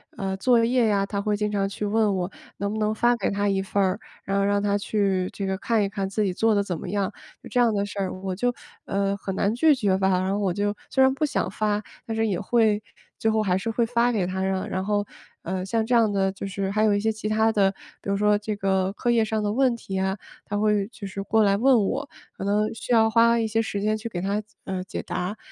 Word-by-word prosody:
呃， 190 -1 -3
作 235 +3 +4
业 240 0 +3
呀， 200 -2 +2
她 200 0 -3
会 210 0 0
经 210 0 -1
常 200 -1 0
去 200 +1 -4
问 210 -1 +2
我， 180 +1 -2 0.3
能 200 +1 -1
不 220 - -3
能 215 0 0
发 240 +2 +3
给 200 - 0
她 205 0 0
一 195 -1 +1
份 195 +1 0
儿？ 190 +2 0 0.2
然 195 0 -1
后 200 - +2
让 205 0 +1
她 205 0 +2
去 195 -3 0
这 200 - -4
个 190 0 -1
看 220 +2 +1
一 200 - -1
看 200 -1 -3
自 210 +2 0
己 195 - +1
做 220 +4 +2
得 200 - +2
怎 175 -5 -4
么 - - -7
样。 200 +2 -1 0.3
就 - - -10
这 250 - 0
样 235 -2 +4
的 200 -1 0
事 205 0 -7
儿， 190 -1 0
我 190 -1 -3
就， 245 +6 0 0.3
呃， 200 0 0
很 195 -1 -5
难 200 +2 +1
拒 295 +5 +4
绝 200 -7 +1
吧， 190 0 +1
然 190 +1 -1
后 200 - 0
我 195 -3 0
就 205 +2 0 0.2
虽 265 - +3
然 265 0 +4
不 305 +3 0
想 290 - -1
发， 210 0 -1 0.2
但 225 - -3
是 225 0 +1
也 195 -5 -1
会 215 0 +2 0.4
最 220 - +1
后 220 0 +2
还 185 -3 +1
是 190 +4 -3
会 230 +1 +1
发 240 +1 +2
给 200 -5 +1
她 185 +1 -3
啊。 190 0 -1
然 185 0 -2
后， 205 0 0 0.4
呃， 185 +1 -3
像 225 +2 0
这 245 +2 +2
样 225 -3 +4
的 195 -1 +1
就 200 - -6
是 195 0 -3
还 215 +2 +1
有 215 -1 +4
一 205 - +2
些 220 +2 +1
其 215 -1 -5
它 220 +1 +3
的， 200 -3 +3 0.3
比 - - -6
如 200 - +1
说 210 0 +3
这 210 0 -4
个 190 -1 +1
课 240 - -2
业 230 -1 +3
上 220 0 -1
的 205 - 0
问 260 +1 +3
题 195 -4 -5
啊， 190 +1 0 0.3
她 205 - -3
会 210 -1 +2
就 205 -4 -8
是 195 +1 -5
过 220 +2 +3
来 200 -1 +4
问 240 -2 +4
我， 280 +6 -2 0.3
可 - - -5
能 210 +2 +1
需 225 - -7
要 220 -1 +5
花 230 +1 +4
一 225 - 0
些 225 +1 +1
时 205 -2 -3
间 215 +1 +1
去 225 +2 -6
给 180 -5 -4
她， 200 +3 -1 0.2
呃， 185 -1 -3
解 190 - -5
答。 185 +4 -3
205 Hz, 290 characters per minute, -25 LUFS, 195-220 Hz, 0.4 s, 要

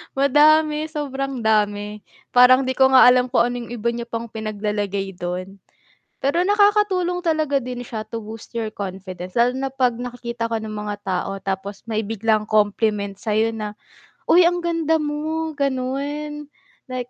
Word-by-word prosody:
Madami, 300 +2 +4
sobrang 275 -5 -4
dami, 210 -1 +1 0.3
parang 250 +1 +6
di 260 - -1
ko 265 - +6
nga 260 - +9
alam 250 0 +4
kung 250 -1 +3
ano 245 - -4
'yung 235 0 -8
iba 235 0 -1
niya 235 0 -5
pang 230 0 -5
pinaglalagay 205 -2 -3
dun, 185 +3 -5 0.6
pero 285 +6 +1
nakakatulong 405 -3 +2
talaga 310 -5 +1
din 250 -1 -5
siya 220 -2 -5
to 225 +1 -6
boost 220 0 -10
your 225 -1 -1
confidence 185 -1 -7
lalo 240 +2 +4
na 270 0 -2
'pag 255 -3 +1
nakikita 235 -1 -5
ka 230 - 0
ng 215 0 -6
mga 210 -1 -4
tao 190 0 -1
tapos 195 +2 -5
may 220 -1 -1
biglang 220 0 0
compliment 210 -1 +1
sa'yo 220 +2 0
na, 210 -1 -6 0.5
''Uy, 350 +1 +7
ang 350 0 +2
ganda 330 -2 +1
mo'' 310 +1 -3
ganun 280 +3 -2 0.4
like, 250 -1 -5
240 Hz, 160 wpm, -22 LUFS, 210-290 Hz, 0.6 s, nga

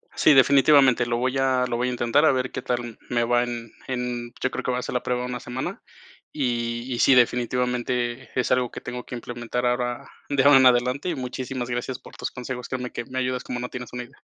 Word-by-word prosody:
Sí, 150 - +5
definitivamente, 135 -2 +5
lo 120 0 -1
voy 130 +2 0
a 130 -1 +2
lo 120 -1 -2
voy 125 +1 0
a - - -1
intentar 125 +5 +2
a - - +6
ver 130 -1 -1
qué - - -4
tal 120 -2 -3
me 120 -1 +1
va 120 +1 +2
en 120 -2 -5 0.2
en 125 -2 -3
yo 130 - 0
creo - - -4
que 125 - -1
va 125 - -1
a - - 0
hacer - - -5
la 125 - -1
prueba 125 0 -1
una 125 0 -4
semana, 125 +2 -5 0.5
y 120 -2 -2
y 120 - -3
sí, 135 - +6
definitivamente 125 0 0
es 125 - +1
algo 125 -1 +2
que - - -8
tengo 125 0 -6
que - - -7
implementar 120 0 -4
ahora 120 0 -1 0.2
de 140 -2 +2
ahora 145 0 +8
en 130 - +5
adelante 125 +6 +3
y - - -1
muchísimas 125 0 -4
gracias 125 +1 -3
por - - -14
tus - - -4
consejos, 125 -1 -6
créeme 125 -1 -4
que 120 - -5
me 130 +2 -4
ayudas 125 -1 -1
como 120 - -4
no 125 - -4
tienes 125 -1 -8
una 125 0 -4
idea. 120 - -18
125 Hz, 240 wpm, -24 LUFS, 120-130 Hz, 0.5 s, ahora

